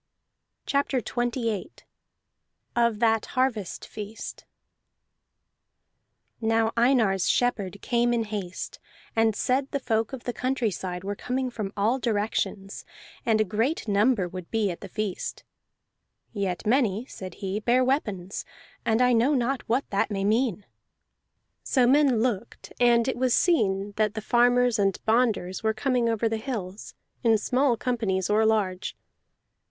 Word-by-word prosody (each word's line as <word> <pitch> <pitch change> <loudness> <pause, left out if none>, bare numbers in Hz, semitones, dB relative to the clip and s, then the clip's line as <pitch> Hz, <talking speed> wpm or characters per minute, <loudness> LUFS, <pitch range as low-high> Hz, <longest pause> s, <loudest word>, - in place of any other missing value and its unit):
CHAPTER 280 -1 +1
XXVIII 240 - -2 1.0
OF 235 -2 +2
THAT 225 0 +2
HARVEST 240 -8 0
FEAST 215 +1 -8 2.0
Now 225 0 +2
Einar's 230 -6 +3
shepherd 205 -6 0
came 240 -1 +2
in 235 -1 +1
haste, 205 -4 -5 0.4
and 225 -1 +3
said 265 +5 0
the 280 - -2
folk 225 -3 0
of 265 -3 -7
the 245 - -3
country 255 -2 0
side 180 -1 -5
were 200 +1 -2
coming 255 +3 -2
from 210 -4 -4
all 225 +6 +2
directions, 205 -3 -2 0.4
and 220 -1 +3
a - - +5
great 225 - -1
number 205 -1 +2
would 180 -1 -8
be 220 -4 +1
at 170 - -8
the 195 - -7
feast. 210 -1 -4 0.9
"Yet 195 -2 -2
many," 230 -2 +2
said 185 -8 -9
he, 195 +1 -3
"bear 245 +4 +3
weapons, 210 - -1 0.4
and 225 +2 +2
I 250 0 +4
know 245 +6 +3
not 255 +1 0
what 250 +4 +1
that 200 +2 +1
may 195 -2 -2
mean." 215 -2 +1 1.0
So 255 -3 +3
men 265 -3 +4
looked, 235 -2 -3
and 240 -1 +4
it 260 - -1
was 255 -1 +2
seen 205 - +2
that 215 -1 +1
the 220 - -3
farmers 245 0 +3
and 195 -2 +2
bonders 220 -5 +1
were 220 -1 0
coming 245 0 +1
over 225 0 +1
the 225 0 -1
hills, 215 -5 -6 0.3
in 225 -2 +4
small 250 +3 +1
companies 215 -6 -1
or 220 +1 +4
large. 190 -4 0
225 Hz, 140 wpm, -26 LUFS, 205-245 Hz, 2.0 s, a